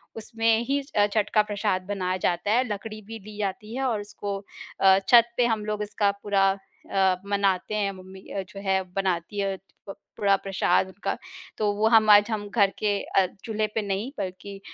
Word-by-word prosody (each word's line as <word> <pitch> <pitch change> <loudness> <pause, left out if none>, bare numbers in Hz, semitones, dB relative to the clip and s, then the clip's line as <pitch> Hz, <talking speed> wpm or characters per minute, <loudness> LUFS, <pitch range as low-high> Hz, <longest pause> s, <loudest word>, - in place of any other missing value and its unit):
उसमें 225 0 +1
ही 280 +1 +1
छ 275 - -20
अ, 205 -1 +5
छठ 215 -2 +1
का 215 - +6
प्रसाद 205 -2 -1
बनाया 185 -2 -1
जाता 175 +3 0
है। 245 +3 +4
लकड़ी 215 +1 -6
भी 225 +2 -9
दी 210 +1 -12
जाती 210 +2 -4
है 270 - -2
और 220 -4 -1
उसको 205 -1 -5 0.4
अ, 190 0 +6
छत 235 -1 +7
पे 245 - +4
हम 220 -3 0
लोग 210 0 -2
इसका 205 -1 +1
पूरा 195 -1 +3 0.4
अ, 190 -1 +3
मनाते 200 0 0
हैं, 205 -2 0
मम्मी 190 0 -12
अ, 195 - -2
जो 200 - -9
है 190 -1 +1
बनाती 190 0 -1
हैं 195 -1 -1 0.3
प 195 - -6 0.2
पूरा 200 -1 +4
प्रसाद 190 -2 +1
उनका। 190 +2 -4 0.4
तो 210 -1 +1
वो 210 +2 +2
हमारा 215 -2 +7
ज - - -6
हम 205 -1 -3
घर 200 -2 +3
के 205 -1 +1
अ, 195 - +2 0.2
चूल्हे 215 -1 -1
पे 220 - +1
नहीं, 200 +4 -2
बल्कि 190 +2 -6
205 Hz, 200 wpm, -26 LUFS, 195-215 Hz, 0.4 s, छत